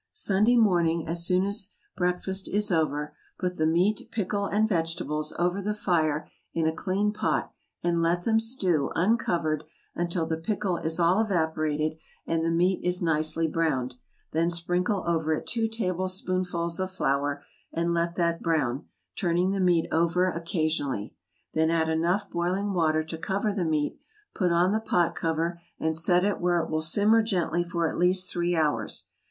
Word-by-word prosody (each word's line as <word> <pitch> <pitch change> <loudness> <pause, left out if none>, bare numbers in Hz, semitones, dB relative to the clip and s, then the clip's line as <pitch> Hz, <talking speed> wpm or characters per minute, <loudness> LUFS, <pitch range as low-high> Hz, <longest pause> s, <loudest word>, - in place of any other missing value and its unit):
Sunday 225 - +3
morning, 170 -7 +3
as 170 +1 -1
soon 185 +1 +3
as 200 0 -2 0.3
breakfast 185 +2 -1
is 210 +1 +1
over, 150 -3 0 0.2
put 180 -1 -2
the 155 - +2
meat, 180 +6 +1
pickle, 200 -1 -1
and 215 +2 +2
vegetables, 165 -4 -1
over 180 +3 0
the 210 +2 -2
fire 160 -7 0 0.3
in 165 - +1
a 160 - +2
clean 205 +3 0
pot, 210 - -1 0.3
and 170 -1 +1
let 170 +1 +1
them 220 +1 +3
stew, 190 - +1
uncovered, 170 -6 +1 0.3
until 170 -1 -1
the 160 0 -2
pickle 195 +1 -1
is 160 +1 -2
all 175 +5 +4
evaporated 155 -5 0 0.3
and 165 0 0
the 165 - +1
meat 180 +3 +1
is 180 0 +1
nicely 160 0 +1
browned; 150 -6 0 0.4
then 165 +2 +1
sprinkle 180 +3 0
over 160 -2 +1
it - - -6
two 230 -1 0
tablespoonfuls 185 -4 -2
of 185 0 -1
flour, 145 -5 -1 0.3
and 170 +1 0
let 170 0 0
that 170 -1 0
brown, 150 -5 0 0.3
turning 175 +1 +1
the 195 - -1
meat 175 -3 +3
over 170 +3 +2
occasionally; 155 - -2 0.4
then 160 0 +2
add 160 -1 +1
enough 170 +5 +1
boiling 185 +4 -1
water 155 -3 +2
to 160 +1 -7
cover 200 +3 -1
the 195 -3 -1
meat, 155 -3 -1 0.3
put 180 -3 +1
on 175 +2 +3
the 215 - +1
pot 175 -6 +1
cover, 165 +1 -2 0.2
and 160 0 0
set 175 +3 +3
it 205 - -1
where 175 -1 +2
it 160 - -3
will 155 0 0
simmer 205 +8 +4
gently 175 -5 0
for 170 -1 -1
at - - -4
least 180 +1 +2
three 175 0 0
hours. 150 -9 0
170 Hz, 170 wpm, -27 LUFS, 160-190 Hz, 0.4 s, all